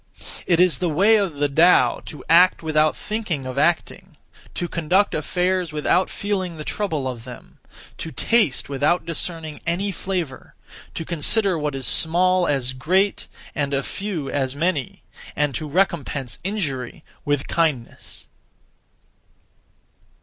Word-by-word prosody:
(It 170 Hz, -2 st, +3 dB
is 180 Hz, -7 st, +4 dB
the 175 Hz, -, 0 dB
way 200 Hz, +8 st, +4 dB
of 195 Hz, -7 st, -1 dB
the 145 Hz, 0 st, +2 dB
Tao) 165 Hz, +6 st, +4 dB
to 150 Hz, -, -9 dB
act 175 Hz, +1 st, +5 dB
without 155 Hz, -1 st, +2 dB
(thinking 210 Hz, -11 st, -3 dB
of) 130 Hz, +1 st, -3 dB
acting; 170 Hz, +1 st, -1 dB, 0.4 s
to 175 Hz, -, -2 dB
conduct 175 Hz, +5 st, +1 dB
affairs 180 Hz, +2 st, 0 dB
without 155 Hz, +5 st, +1 dB
(feeling 190 Hz, -5 st, -3 dB
the) 155 Hz, -, -6 dB
trouble 160 Hz, -8 st, -2 dB
of 120 Hz, -3 st, -6 dB
them; 125 Hz, 0 st, -12 dB, 0.4 s
to 160 Hz, -, -4 dB
taste 220 Hz, -, +1 dB
without 145 Hz, +5 st, 0 dB
discerning 165 Hz, -1 st, -3 dB
any 190 Hz, +4 st, 0 dB
flavour; 180 Hz, -6 st, -5 dB, 0.4 s
to 165 Hz, -, -4 dB
consider 185 Hz, +4 st, +2 dB
what 150 Hz, -3 st, -2 dB
is 135 Hz, -1 st, -4 dB
small 180 Hz, +2 st, +2 dB
as 130 Hz, -3 st, 0 dB
great, 185 Hz, +10 st, +1 dB, 0.3 s
and 140 Hz, -2 st, -1 dB
a 135 Hz, -, 0 dB
few 190 Hz, -7 st, -4 dB
as 135 Hz, -1 st, -1 dB
many; 155 Hz, -3 st, -2 dB, 0.3 s
and 150 Hz, -2 st, 0 dB
to 150 Hz, +4 st, -4 dB
recompense 145 Hz, -7 st, -1 dB
injury 155 Hz, -, -3 dB, 0.2 s
with 145 Hz, -2 st, -1 dB
kindness. 155 Hz, -8 st, -2 dB
165 Hz, 135 wpm, -22 LUFS, 145-185 Hz, 0.4 s, act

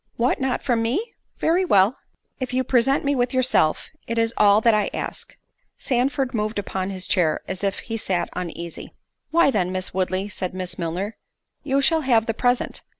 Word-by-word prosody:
"What 245 Hz, +3 st, +1 dB
not 260 Hz, -1 st, -1 dB
from 240 Hz, -4 st, +1 dB
me? 355 Hz, -, -1 dB, 0.2 s
Very 345 Hz, +4 st, +2 dB
well." 205 Hz, -, +4 dB, 0.4 s
"If 255 Hz, -1 st, -3 dB
you 260 Hz, -, +2 dB
present 265 Hz, +3 st, +2 dB
me 285 Hz, -, +2 dB
with 245 Hz, -1 st, 0 dB
yourself, 255 Hz, -11 st, +2 dB, 0.2 s
it 230 Hz, -, -3 dB
is 230 Hz, 0 st, +1 dB
all 205 Hz, 0 st, +5 dB
that 230 Hz, 0 st, +4 dB
I 210 Hz, -1 st, +1 dB
ask." -, -, -5 dB, 0.4 s
Sandford 260 Hz, 0 st, 0 dB
moved 215 Hz, -1 st, -2 dB
upon 190 Hz, -1 st, -3 dB
his 190 Hz, -1 st, -5 dB
chair, 165 Hz, -5 st, +2 dB
as 190 Hz, +1 st, -5 dB
if 195 Hz, -1 st, -1 dB
he 225 Hz, -1 st, -4 dB
sat 180 Hz, -5 st, -1 dB
uneasy. 170 Hz, -1 st, -6 dB, 0.3 s
"Why 335 Hz, -3 st, +4 dB
then, 185 Hz, -6 st, 0 dB
Miss 185 Hz, 0 st, -3 dB
Woodley," 185 Hz, +1 st, -1 dB
said 185 Hz, -2 st, -4 dB
Miss 185 Hz, -1 st, -3 dB
Milner, 180 Hz, +6 st, -3 dB, 0.4 s
"you 275 Hz, -1 st, +1 dB
shall 320 Hz, +4 st, +3 dB
have 235 Hz, -5 st, +3 dB
the 225 Hz, -, -1 dB
present. 245 Hz, +2 st, 0 dB
225 Hz, 185 wpm, -23 LUFS, 185-260 Hz, 0.4 s, all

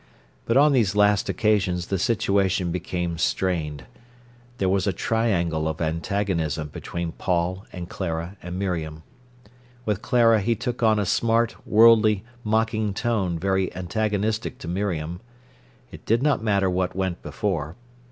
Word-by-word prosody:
But 115 Hz, -, +2 dB
on 145 Hz, +2 st, +6 dB
these 110 Hz, -7 st, +2 dB
last 105 Hz, 0 st, +3 dB
occasions 95 Hz, -5 st, +1 dB
the 95 Hz, -, 0 dB
situation 100 Hz, -5 st, +1 dB
became 90 Hz, -1 st, -3 dB
strained. 80 Hz, -8 st, -1 dB, 0.7 s
There 95 Hz, -, 0 dB
was 95 Hz, +1 st, +1 dB
a 100 Hz, -, +1 dB
triangle 85 Hz, -8 st, 0 dB
of 80 Hz, 0 st, -3 dB
antagonism 80 Hz, -2 st, -1 dB
between 85 Hz, +3 st, -5 dB
Paul 90 Hz, +3 st, -2 dB
and 90 Hz, -1 st, -7 dB
Clara 85 Hz, 0 st, -4 dB
and 90 Hz, +1 st, -6 dB
Miriam. 80 Hz, -5 st, -3 dB, 0.8 s
With 105 Hz, -2 st, -1 dB
Clara 115 Hz, -4 st, +4 dB
he 115 Hz, +4 st, +1 dB
took 120 Hz, +3 st, -4 dB
on 110 Hz, -2 st, +4 dB
a 105 Hz, -, 0 dB
smart, 115 Hz, +4 st, +1 dB
worldly, 110 Hz, -2 st, +5 dB, 0.2 s
mocking 110 Hz, -1 st, 0 dB
tone 100 Hz, -7 st, 0 dB
very 95 Hz, +2 st, 0 dB
antagonistic 105 Hz, +4 st, -1 dB
to -, -, -9 dB
Miriam. 90 Hz, -2 st, -3 dB, 0.7 s
It -, -, -11 dB
did 115 Hz, +3 st, +2 dB
not 145 Hz, -5 st, +2 dB
matter 100 Hz, -3 st, +2 dB
what 90 Hz, 0 st, -1 dB
went 95 Hz, -2 st, -2 dB
before. 80 Hz, -7 st, -3 dB
95 Hz, 140 wpm, -24 LUFS, 85-110 Hz, 0.8 s, on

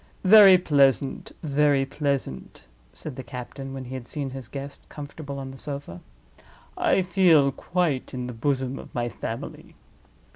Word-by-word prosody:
"Very 195 Hz, -1 st, +9 dB
pleasant! 140 Hz, -5 st, +2 dB
very 145 Hz, -2 st, +2 dB
pleasant!" 135 Hz, -, -3 dB, 0.3 s
said 145 Hz, -5 st, -8 dB
the 130 Hz, -, -5 dB
captain, 125 Hz, +3 st, -7 dB
when 135 Hz, -1 st, -6 dB
he 125 Hz, -, -8 dB
had 130 Hz, -2 st, -6 dB
seen 140 Hz, -3 st, -4 dB
his 130 Hz, -3 st, -7 dB
guest 140 Hz, +2 st, -7 dB
comfortable 145 Hz, -1 st, -8 dB
on 135 Hz, -1 st, -6 dB
the 135 Hz, -, -9 dB
sofa. 140 Hz, -, -5 dB, 0.7 s
"I 190 Hz, -, +2 dB
feel 170 Hz, -6 st, +4 dB
quite 160 Hz, -2 st, -1 dB
in 125 Hz, -2 st, -4 dB
the 125 Hz, -, -6 dB
bosom 130 Hz, +2 st, -1 dB
of -, -, -12 dB
my 120 Hz, -1 st, -1 dB
family. 115 Hz, 0 st, -7 dB
140 Hz, 150 wpm, -25 LUFS, 130-150 Hz, 0.7 s, Very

